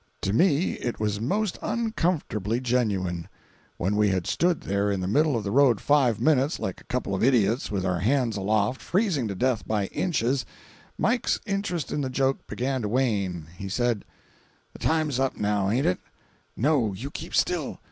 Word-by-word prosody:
To 95 - -1
me 160 - +3
it 120 - -3
was 105 -1 -1
most 200 - -1
uncomfortably 170 - -1
genuine. 100 -9 -1 0.5
When 95 +4 0
we 105 0 +3
had 95 -2 0
stood 175 -1 +1
there 100 +1 0
in 100 -2 0
the 90 - -2
middle 145 +4 +2
of 110 - -3
the 100 - -3
road 130 -4 +4
five 135 -7 +3
minutes, 145 -1 +2
like 95 - -4
a - - -19
couple 125 -6 -2
of 95 - 0
idiots, 120 -2 +3
with 95 -2 -2
our 90 -1 0
hands 120 - +1
aloft, 105 +4 0
freezing 180 - 0
to 100 - -4
death 125 +1 0
by 105 -2 0
inches, 135 -7 0 0.5
Mike's 240 +2 +1
interest 195 -6 -2
in 150 - -1
the 135 - -2
joke 135 +1 0
began 130 +1 -2
to 105 - -2
wane. 100 -9 0
He 95 +1 -6
said: 120 0 0 0.7
"The - - -12
time's 155 -5 +1
up, 135 0 0
now, 105 -2 +1
aint 125 +6 +1
it?" 90 - +1 0.6
"No, 125 -5 +2
you 130 +9 -6
keep - - -6
still. - - 0
120 Hz, 180 wpm, -26 LUFS, 100-145 Hz, 0.7 s, road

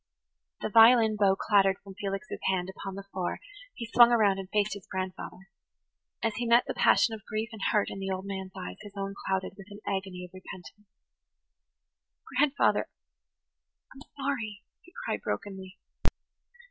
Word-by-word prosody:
The - - -1
violin 225 0 +7
bow 200 -2 +4
clattered 195 -1 +3
from 195 0 -10
Felix's 195 +4 -4
hand 190 -1 0
upon 195 0 -7
the 195 - -6
floor; 185 -2 -2 0.4
he 235 - -5
swung 240 +1 +7
around 205 -5 +4
and 190 -1 -7
faced 210 +1 +1
his 200 -3 -9
grandfather. 185 0 -6 0.7
As 225 -2 0
he 245 -1 -1
met 235 +1 +6
the - - -3
passion 225 - +4
of 215 -2 -7
grief 215 +1 -2
and 220 -3 -9
hurt 210 -3 +2
in - - -6
the 195 0 -3
old 190 0 -3
man's 190 -1 -5
eyes 90 0 -6
his 205 -1 -11
own 195 0 -3
clouded 190 -1 -1
with 195 -1 -11
an 205 0 -10
agony 190 -2 -3
of 180 - -16
repentance. 185 +2 -11 1.5
"Grandfather–I'm 275 -1 -2 0.2
sorry," 225 -7 -3 0.2
he 360 - -19
cried - - -2
brokenly. 190 -2 -5
200 Hz, 160 wpm, -29 LUFS, 190-225 Hz, 1.5 s, violin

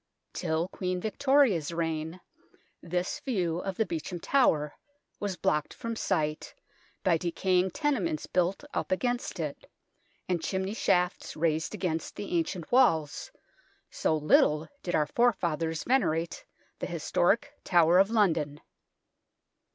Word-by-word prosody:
Till 160 +2 -1
Queen 180 -2 -3
Victoria's 220 - +2
reign 165 +1 -3 0.6
this 180 +1 -2
view 180 -10 -1
of 190 0 -4
the 220 - +2
Beauchamp 170 0 -5
Tower 155 - +2 0.5
was 200 -3 -3
blocked 150 -1 0
from 230 0 -4
sight 155 -8 -1 0.5
by 180 -4 +3
decaying 180 +2 +1
tenements 200 - -1
built 185 +6 0
up - - -2
against 245 +6 -1
it, - - -5 0.6
and 180 -2 0
chimney 190 +3 -2
shafts 180 -5 0
raised 160 +4 0
against 170 -5 -3
the 200 -3 -4
ancient 170 0 -2
walls, 165 - +3 0.6
so 160 - +1
little 150 0 +3
did 175 - -2
our 150 - +3
forefathers 165 -6 0
venerate 240 - 0 0.3
the - - -3
historic - - +1
Tower 175 0 +5
of 195 +1 +5
London. 165 -10 +1
180 Hz, 120 wpm, -29 LUFS, 160-205 Hz, 0.6 s, Tower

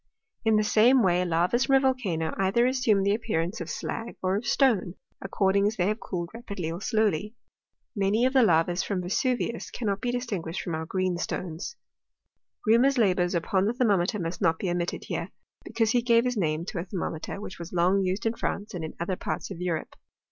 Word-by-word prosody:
In 220 -1 +3
the 215 - +3
same 230 +4 +5
way 180 -1 +3
lavas 180 +8 +1
from 270 - +3
a - - +7
volcano 210 -12 0
either 195 +5 +3
assume 250 -6 +2
the 200 +1 +3
appearance 210 -3 -2
of - - -5
fe]a;r 230 +1 -4
or 185 +1 +1
of 210 +4 -3
stone, 220 -10 +2 0.3
according 195 +1 +2
as 215 - -1
they 180 - +1
have 215 +1 -1
cooled 175 -2 -4
ra 230 - -8
pidly 185 -8 -4
or 175 - -7
slowly. 215 -1 0 0.6
Many 205 +4 +2
of 260 - +1
the 265 - +6
lavas 175 -3 +3
from 190 -3 -2
Vesuvius 235 +5 -1
cannot 205 -4 -2
be 245 - -1
distinjruished 200 -9 -3
from 175 - -4
our 160 0 -3
greenstones. 180 - -3 0.9
ilc'aiirnur*8 250 +5 +4
labours 185 -5 +2
upon 185 +3 +1
the 220 - +1
thermometer 210 -5 +2
must 170 +2 -4
not 165 -3 +3
be 185 0 -2
omitted 175 0 -2
hr^e; - - -4 0.3
because 225 -1 0
he 245 - +3
gave 235 0 +3
his 250 0 0
name 160 -4 -1
to 180 - -4
a - - -2
ther« 190 0 -6
moincter, 165 +2 -4
which 195 -3 -8
was 170 +1 -7
long 180 +3 +3
used 190 +2 -1
in 225 - +2
France 210 -2 -3
and 175 -3 -4
in 155 - -6
other 175 +2 -1
parts - - -4
of 180 - -7
Kurope. 175 -3 -3
195 Hz, 205 wpm, -27 LUFS, 175-230 Hz, 0.9 s, a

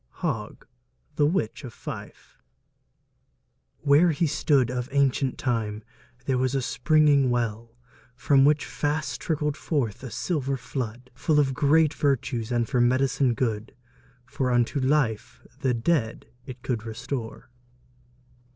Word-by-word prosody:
HOGG: - - -3 0.5
The 145 - +3
Witch 150 - -1
of 120 -4 -9
Fife.... - - -9 1.4
where 150 +4 +5
he 165 +1 +1
stood, 145 -5 +2
Of 125 0 -3
auncient 135 -1 +1
time 110 -4 -2 0.4
there 130 -2 +1
was 130 +1 0
a 135 - +1
springing 145 0 +3
well, 115 -1 -2 0.4
From 135 +2 +3
which 150 +1 +3
fast 150 +1 -2
trickled 150 -2 -1
forth 140 - -2
a 130 - -7
silver 140 -2 -2
flood, 125 -1 -6
Full 150 +3 +1
of 135 -2 +2
great 150 +3 +3
vertues, 125 -4 -1
and 120 -1 +1
for 125 -3 +1
med'cine 130 0 +2
good:... 110 -2 -2 0.5
For 130 0 -2
unto 120 +3 +1
life 130 -5 0
the 130 -2 +1
dead 115 -1 0 0.2
it 130 -1 -9
could 115 -4 -2
restore. 115 +1 -6
130 Hz, 130 wpm, -26 LUFS, 120-145 Hz, 1.4 s, where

